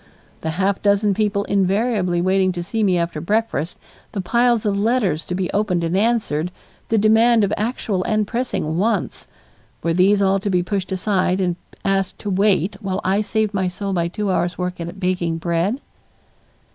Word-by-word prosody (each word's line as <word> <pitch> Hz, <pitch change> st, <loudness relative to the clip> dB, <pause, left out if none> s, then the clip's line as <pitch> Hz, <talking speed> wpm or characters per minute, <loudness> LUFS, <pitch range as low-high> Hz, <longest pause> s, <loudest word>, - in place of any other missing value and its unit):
The 160 Hz, -, -2 dB
half 195 Hz, +1 st, +1 dB
dozen 205 Hz, 0 st, +3 dB
people 205 Hz, 0 st, 0 dB
invariably 195 Hz, -2 st, +1 dB
waiting 190 Hz, 0 st, +2 dB
to 175 Hz, -1 st, -4 dB
see 220 Hz, +5 st, -2 dB
me 190 Hz, -4 st, +3 dB
after 170 Hz, -2 st, -2 dB
breakfast, 205 Hz, -2 st, -1 dB, 0.4 s
the 200 Hz, -, -3 dB
piles 235 Hz, +4 st, +2 dB
of 205 Hz, -1 st, +1 dB
letters 200 Hz, -7 st, +1 dB
to 180 Hz, -, -3 dB
be 185 Hz, -1 st, -2 dB
opened 200 Hz, -4 st, +1 dB
and 165 Hz, +2 st, -1 dB
answered, 200 Hz, -7 st, +1 dB, 0.4 s
the 225 Hz, -, +1 dB
demand 220 Hz, +2 st, +4 dB
of 200 Hz, +1 st, +1 dB
actual 210 Hz, -3 st, -2 dB
and 215 Hz, -1 st, +1 dB
pressing 200 Hz, -9 st, -2 dB
wants 225 Hz, +4 st, -1 dB, 0.6 s
were 165 Hz, -, +1 dB
these 190 Hz, +4 st, +4 dB
all 195 Hz, 0 st, +3 dB
to 200 Hz, -, -3 dB
be 180 Hz, -2 st, +2 dB
pushed 190 Hz, 0 st, -3 dB
aside 185 Hz, -1 st, +1 dB
and 180 Hz, -2 st, 0 dB, 0.3 s
asked 195 Hz, -1 st, 0 dB
to 205 Hz, -, -4 dB
wait 195 Hz, -1 st, +2 dB
while 190 Hz, 0 st, -2 dB
I 195 Hz, +2 st, +2 dB
saved 215 Hz, 0 st, -1 dB
my 190 Hz, -2 st, 0 dB
soul 195 Hz, +2 st, -3 dB
by 170 Hz, -2 st, +1 dB
two 200 Hz, +3 st, -2 dB
hours' 175 Hz, -1 st, 0 dB
work 180 Hz, 0 st, -3 dB
at 175 Hz, +3 st, -6 dB
baking 180 Hz, -3 st, 0 dB
bread? 170 Hz, +8 st, 0 dB
195 Hz, 180 wpm, -21 LUFS, 180-210 Hz, 0.6 s, demand